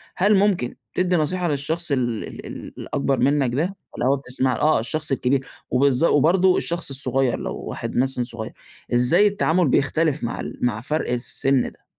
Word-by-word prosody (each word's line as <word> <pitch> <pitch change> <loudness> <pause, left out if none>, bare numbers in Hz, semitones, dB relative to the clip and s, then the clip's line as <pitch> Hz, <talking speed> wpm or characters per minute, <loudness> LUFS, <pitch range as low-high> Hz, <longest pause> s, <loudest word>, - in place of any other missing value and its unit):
هل 205 +3 +3
ممكن 190 -11 +1 0.2
تدّي 180 0 +1
نصيحة 175 +3 0
للشخص 155 +3 -1
ال 120 -5 0
ال - - -10
ال - - -8
الأكبر 135 -1 -1
منك 135 -3 +2
ده؟ 175 +8 -1 0.2
والّا - - -3
هو 135 +2 +4
بتسمَع، 130 -1 -1
آه، 155 +7 +2
الشخص 155 +6 0
الكبير 135 0 +1 0.3
وبالض 135 +1 +2
وبرضه 175 +4 +4
الشخص 170 -2 -1
الصغير 135 -2 -1
لو - - -4
واحد - - -6
مثلًا 130 0 +1
صغير، 115 -2 -7 0.4
إزاي 125 +12 +5
التعامل 180 -4 +1
بيختلف 150 +2 +1
مع 115 - -3
ال - - -6
مع 115 -3 0
فرْق 150 +2 -2
السِن 130 +2 +1
ده؟ - - -27
140 Hz, 170 wpm, -22 LUFS, 125-165 Hz, 0.4 s, إزاي